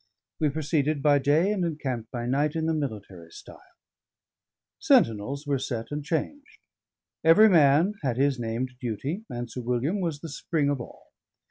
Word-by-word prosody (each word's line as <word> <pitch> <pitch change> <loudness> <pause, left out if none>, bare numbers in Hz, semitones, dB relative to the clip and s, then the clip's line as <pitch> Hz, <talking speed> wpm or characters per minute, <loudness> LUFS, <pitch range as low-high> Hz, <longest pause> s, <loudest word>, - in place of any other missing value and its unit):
We 155 - +2
proceeded 150 -1 -1
by 145 -1 +5
day 155 +8 +2
and 200 -4 -1
encamped 135 -9 -3
by 120 -1 -5
night 145 +5 0
in 160 -1 -1
the 160 - +1
military 105 - -5
style; - - -13 1.2
sentinels 115 +7 +2
were 140 -2 0
set 115 -2 -4
and 150 0 -4
changed; 280 - -4 0.7
every 185 +7 +7
man 160 +2 +4
had 130 -5 -1
his 135 -1 +1
named 120 +2 -3
duty; 140 - -4
and 120 0 -5
Sir 125 +2 -7
William 125 - -1
was 160 -5 -3
the 165 - -7
spring 145 0 -1
of 140 -3 -2
all. - - -11
145 Hz, 160 wpm, -26 LUFS, 125-160 Hz, 1.2 s, every